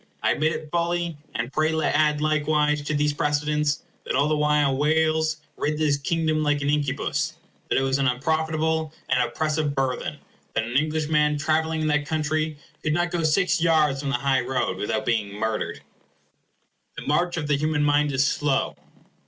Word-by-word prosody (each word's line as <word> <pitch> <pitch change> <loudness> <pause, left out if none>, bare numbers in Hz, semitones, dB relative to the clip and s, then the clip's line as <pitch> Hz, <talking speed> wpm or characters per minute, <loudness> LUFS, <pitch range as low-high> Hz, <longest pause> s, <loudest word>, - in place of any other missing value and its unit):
I - - +3
admit 155 +2 +1
it 155 -1 -6
fully; 170 -1 0 0.2
and 120 +3 -3
pray 155 +1 +2
add 150 0 +2
likewise 150 -1 +1
to 150 +1 -2
these 150 0 +1
precedents 150 0 0 0.2
that - - -2
all 140 +3 +3
the 155 - +2
while 150 -2 +2
Wales 155 +2 +2 0.2
rid 150 +1 -1
this 150 -2 +2
Kingdom 155 +1 0
like 145 -1 +1
an 140 - +1
incubus, 145 -2 -1 0.3
that - - +2
it 135 - +2
was 135 +1 +1
an 135 - +2
unprofitable 160 +3 0
and - - +3
oppressive 155 -2 -1
burthen, 135 -2 -1
and - - -25 0.4
that 115 - +1
an 120 +2 -5
Englishman 150 0 +2
travelling 160 +2 0
in 155 - 0
that 150 -1 +1
country 155 0 -1 0.2
could 155 - 0
not 175 +1 0
go 175 -2 -1
six 180 +3 +2
yards 155 -5 +3
from 140 - -3
the 135 - +1
high 130 +1 +1
road 125 -7 -1
without 110 +2 -2
being 105 -4 -1
murdered. 110 +1 -2 1.2
The - - -6
march 175 +4 +1
of 160 - -2
the 145 0 +2
human 150 +1 0
mind 145 0 +3
is 135 0 +2
slow. 140 -1 0
150 Hz, 180 wpm, -24 LUFS, 140-155 Hz, 1.2 s, I